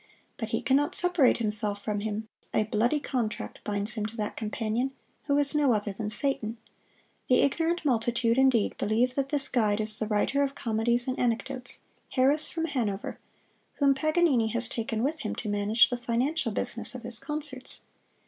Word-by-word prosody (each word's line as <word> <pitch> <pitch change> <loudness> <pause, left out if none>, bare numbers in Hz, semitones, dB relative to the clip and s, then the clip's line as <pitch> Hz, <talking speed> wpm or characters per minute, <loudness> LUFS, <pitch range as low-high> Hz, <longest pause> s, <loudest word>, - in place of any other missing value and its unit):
But - - -4
he - - -2
can 265 - +3
not 290 +1 -1
separate 355 -7 +4
himself 210 -2 0
from 210 -1 -2
him; 215 +1 -4 0.3
a 215 - +3
bloody 225 +7 +1
contract 245 -6 -4
binds 205 +1 0
him 215 - -3
to 225 +2 -11
that 210 -1 -3
companion, 225 +4 -2 0.3
who 285 -1 +2
is 290 0 +5
no 290 -4 +3
other 205 -1 -2
than 210 +1 -4
Satan. 230 -1 +2 0.7
The 250 - +4
ignorant 325 +4 0
multitude, 235 -1 +1
indeed, 260 -5 +3
believe 235 +4 +1
that 275 0 -1
this 285 -2 +3
guide 215 -4 +1
is 215 0 0
the 215 - -2
writer 220 +6 +1
of 275 0 -1
comedies 235 +1 0
and 255 - -2
anecdotes, 245 +1 -2 0.3
Harris 280 +4 +3
from 325 0 -2
Hanover, 225 -10 -3 0.6
whom 280 -1 +4
Paganini 305 -4 +2
has 235 +2 -1
taken 225 0 -3
with 305 +4 -1
him - - -4
to 220 - -6
manage 210 +4 +3
the 245 - -1
financial 245 +3 -1
business 230 +4 -2
of 250 - -8
his 235 -1 -2
concerts. 280 -2 -4
240 Hz, 175 wpm, -28 LUFS, 215-275 Hz, 0.7 s, is